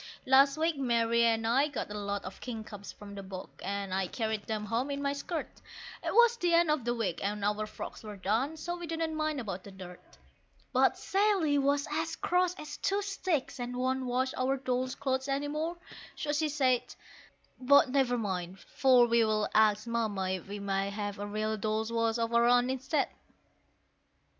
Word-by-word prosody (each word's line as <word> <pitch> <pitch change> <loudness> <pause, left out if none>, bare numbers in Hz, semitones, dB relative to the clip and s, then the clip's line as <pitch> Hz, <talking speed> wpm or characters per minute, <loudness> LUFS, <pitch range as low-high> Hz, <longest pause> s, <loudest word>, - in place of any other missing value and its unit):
Last 275 +2 +5
week 320 -1 +1
Mary 235 -3 +2
and 225 -1 +2
I 260 +6 +3
got 275 -7 -5
a 210 - -4
lot 200 0 -3
of 185 - -9
kingcups 220 -4 -7
from 205 -1 -11
the 200 - -6
bog, 190 -1 -8
and 200 -1 -3
I 190 -1 0
carried 220 0 -3
them 215 -1 -2
home 230 +6 -1
in 280 0 -2
my 280 0 0
skirt; 315 +3 -5 0.4
It - - -1
was 475 0 +5
the 350 -6 +2
end 335 -2 +4
of 295 -6 0
the 240 0 0
week, 190 -7 -2
and 205 0 -2
our 210 +1 0
frocks - - -8
were 210 -2 -8
done, 230 +11 0
so 345 +3 -4
we 345 -1 -7
didn't 325 0 -2
mind 310 -2 -1
about 195 -6 -5
the - - -10
dirt. 185 -2 -12 0.6
But - - +4
Sally 385 -8 +2
was 280 +1 +1
as 320 +2 -1
cross 360 0 +1
as 295 -4 -8
two 400 +1 0
sticks, 370 -9 -2
and 245 0 -4
won't 260 +1 0
wash 255 +2 0
our 265 +1 +1
dolls' 255 -1 -1
clothes 265 0 -1
any 280 +1 -1
more 315 +4 -3 0.4
so 295 - -2
she 305 +1 +1
said, 260 -4 +2 0.8
But 280 +1 +5
never 255 -2 +2
mind, 190 -4 -3 0.2
for 255 -2 +6
we'll 220 -2 +2
ask 215 0 +4
Mamma 215 -5 -1
if 190 -1 -4
we 205 +1 -5
may 195 -1 -1
have 205 0 -4
a 205 - -4
real 215 +1 -2
Dolls' 215 +2 -1
Wash 230 0 +1
of 230 0 -1
our 235 0 +5
own 245 +1 +4
instead. 265 +3 0
245 Hz, 190 wpm, -30 LUFS, 210-285 Hz, 0.8 s, for